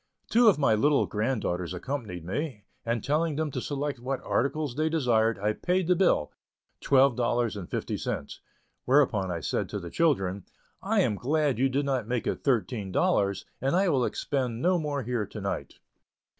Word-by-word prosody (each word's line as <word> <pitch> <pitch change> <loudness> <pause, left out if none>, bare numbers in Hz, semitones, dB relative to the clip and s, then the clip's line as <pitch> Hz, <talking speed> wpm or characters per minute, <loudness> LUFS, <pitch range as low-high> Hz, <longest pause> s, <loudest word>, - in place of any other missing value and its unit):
Two 235 +1 +5
of 200 - +3
my 135 -6 +3
little 140 +7 +3
granddaughters 105 -6 -2
accompanied 105 - -5
me, 115 - -4 0.2
and 115 -1 -1
telling 155 +1 +1
them 155 0 -1
to 130 - -3
select 145 -1 -3
what 130 +2 -3
articles 140 +1 0
they 155 +2 +1
desired, 115 -8 +2
I 105 +2 0
paid 180 +8 0
the 180 - +4
bill, 175 - +2 0.5
twelve 135 -2 +4
dollars 120 -2 0
and 95 -4 -7
fifty - - -3
cents. - - -4 0.5
Whereupon 125 -8 +3
I 85 -2 -3
said 70 - -2
to 105 - -4
the 85 -2 -8
children, 100 - +1 0.4
"I - - +2
am - - +1
glad 140 +3 0
you 135 +1 +3
did 140 +2 0
not 130 -6 -1
make 120 -1 -1
it - - -2
thirteen 115 -6 0
dollars, 100 +1 +1 0.2
and 135 +5 +1
I 190 0 +3
will 135 -6 +2
expend 125 -3 -2
no 180 +5 +2
more 145 -3 -2
here 115 -3 -2
to - - -8
night." - - -4
130 Hz, 185 wpm, -28 LUFS, 105-145 Hz, 0.5 s, Two